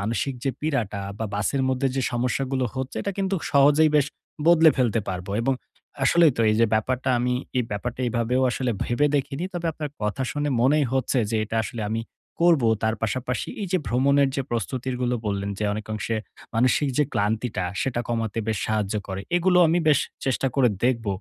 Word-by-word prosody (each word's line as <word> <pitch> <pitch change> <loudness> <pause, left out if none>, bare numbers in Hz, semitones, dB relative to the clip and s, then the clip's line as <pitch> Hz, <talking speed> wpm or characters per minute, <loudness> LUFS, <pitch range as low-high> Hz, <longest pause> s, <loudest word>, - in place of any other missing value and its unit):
মানসিক 115 +6 -1
যে 135 - +2
পীড়াটা, 120 -10 -1 0.2
বা 110 - -2
বাসের 130 +7 0
মধ্যে 130 +1 +1
যে 135 - +1
সমস্যাগুলো 130 +2 0
হচ্ছে, 130 0 -4
এটা 200 - -2
কিন্তু 195 0 0 0.2
সহজেই 145 +2 +5
বেশ 145 -1 +3 0.4
বদলে 165 -1 +7
ফেলতে 120 -4 +2
পারব। 90 -1 -4
এবং 135 +3 +1 0.5
আসলেই 165 +1 +5
তো, - - -1
এই 110 - +2
যে 115 - +5
ব্যাপারটা 130 +4 0
আমি, 125 +1 0 0.2
এই 125 - +1
ব্যাপারটা 115 +5 -4
এইভাবেও 120 +2 0
আসলে 125 0 -1
ভেবে 130 +5 +2
দেখিনি। 140 +4 -2
তবে 175 -1 -2
আপনার 150 -1 -5
কথা 105 +6 -1
শুনে 145 0 -2
মনেই 145 +4 +4
হচ্ছে, 130 0 +1
যে 115 - 0
এটা 110 +1 -4
আসলে 110 +3 -5
আমি 110 +1 -1 0.4
করব। 170 -6 +5 0.2
তার 110 0 +1
পাশাপাশি 125 +3 -2
এই - - -2
যে 185 - +3
ভ্রমণের 140 +3 +3
যে 135 - 0
প্রস্তুতিরগুলো 125 +2 -2
বললেন, 100 -1 -2
যে 105 - -1
অনেকাংশে 110 +1 -3 0.4
মানসিক 130 +5 +3
যে 150 - +5
ক্লান্তিটা 105 -1 -1 0.2
সেটা 125 -3 -1
কমাতে 115 -2 -2
বেশ 110 - 0
সাহায্য 105 -2 -1
করে। 95 0 -4 0.2
এগুলো 180 +1 +3
আমি 165 +2 +2
বেশ 145 -3 +5 0.3
চেষ্টা 135 0 0
করে 130 -3 +4 0.2
দেখব। 115 -3 +1
125 Hz, 180 wpm, -24 LUFS, 110-140 Hz, 0.5 s, বদলে